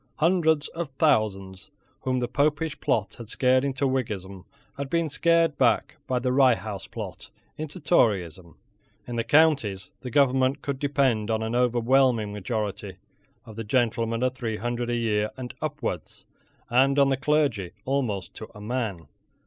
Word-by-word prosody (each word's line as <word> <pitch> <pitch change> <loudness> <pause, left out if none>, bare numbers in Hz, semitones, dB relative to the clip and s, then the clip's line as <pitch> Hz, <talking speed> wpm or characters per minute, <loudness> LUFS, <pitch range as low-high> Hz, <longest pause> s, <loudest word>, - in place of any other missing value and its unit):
Hundreds 160 -2 +2
of 165 -3 -5
thousands 95 - +1 0.3
whom 130 -1 -1
the 120 - -1
Popish 150 +4 0
plot 100 -2 0
had 115 -2 -9
scared 130 +2 +3
into 140 0 -1
Whiggism 100 -8 -3 0.3
had 140 0 -5
been 170 +1 +1
scared 165 0 +2
back 125 +4 +2
by 130 - 0
the 125 +1 0
Rye 130 -2 +5
House 105 -3 -7
plot - - -8 0.3
into 155 +3 -6
Toryism. 95 - +1 0.5
In 120 - -5
the 115 - 0
counties 125 -8 +2
the 125 - -7
government 130 0 +2
could 140 -2 -3
depend 135 -7 +1
on 110 0 0
an 110 +1 -3
overwhelming 120 -2 +2
majority 105 0 -4 0.5
of 110 - -11
the 115 - -4
gentlemen 115 0 0
of 130 0 +1
three 115 -4 -4
hundred 120 +1 -3
a 120 - 0
year 105 -2 0
and 125 -2 -6
upwards, - - -4 0.4
and 135 +3 +3
on 140 -1 +5
the 135 - +2
clergy 140 - +1 0.2
almost 125 -9 -2
to - - -8
a - - -10
man. 105 -6 -3
125 Hz, 155 wpm, -26 LUFS, 110-140 Hz, 0.5 s, Rye